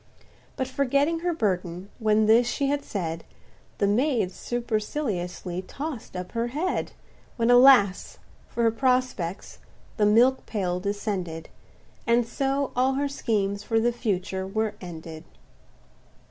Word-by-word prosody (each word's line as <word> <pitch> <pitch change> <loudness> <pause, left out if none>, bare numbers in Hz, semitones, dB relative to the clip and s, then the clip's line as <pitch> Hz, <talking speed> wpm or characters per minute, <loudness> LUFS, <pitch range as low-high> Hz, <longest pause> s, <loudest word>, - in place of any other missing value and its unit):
But 260 - -2
forgetting 280 +4 +1
her 350 +1 0
burden, 185 - -2
when 215 -1 +3
this 230 +3 +5
she 275 +3 0
had 285 0 0
said, 165 -4 -4 0.5
The - - +2
maid 225 -1 +1
superciliously 210 -6 -3
toss'd 270 -1 -6
up 180 0 -6
her 230 0 -1
head 310 +9 -2 0.4
When 230 0 +3
alas! 245 -6 +6 0.3
for 235 - -2
her 225 - +4
prospects—the 230 -4 -2
milk 245 +5 +4
pail 180 -4 -1
descended! 190 -5 -3 0.6
And 235 0 +3
so 275 +3 -1
all 260 +2 +2
her 285 +2 0
schemes 205 -7 -1
for 225 +2 +1
the 240 +2 +1
future 190 -4 -2
were 215 +1 -1
ended. 160 -3 -8
225 Hz, 125 wpm, -26 LUFS, 190-260 Hz, 0.6 s, alas